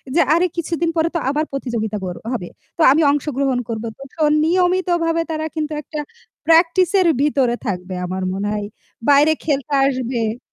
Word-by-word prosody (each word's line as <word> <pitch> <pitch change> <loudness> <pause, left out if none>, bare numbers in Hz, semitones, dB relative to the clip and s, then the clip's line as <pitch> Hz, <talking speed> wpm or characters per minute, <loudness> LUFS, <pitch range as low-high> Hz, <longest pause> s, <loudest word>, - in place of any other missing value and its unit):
যে - - +5
আরে 345 +2 +3
কিছুদিন 335 0 -1
পরে 325 +1 +2
তো - - +2
আবার 300 +2 0
প্রতিযোগিতা 230 -6 -3
কর 180 -1 -4 0.2
হবে। 180 -7 -4 0.3
তো - - -1
আমি 315 +3 +3
অংশগ্রহণ 275 -3 0
করব। 225 0 -3
তো - - -17
তখন 305 -2 +2
নিয়মিতভাবে 350 -1 +1
তারা 315 0 -2
কিন্তু 310 -1 -2
একটা 305 +1 -7 0.5
প্র্যাকটিস 335 +2 +4
এর 360 - +3
ভিতরে 270 -5 +2
থাকবে 185 -1 -4
আমার 185 +1 -4
মনে 200 +2 -2
হয়। 205 -1 -3 0.4
বাইরে 290 +2 +6
খেলতে 285 -1 -1
আসবে 245 -3 -2
290 Hz, 165 wpm, -19 LUFS, 235-330 Hz, 0.5 s, বাইরে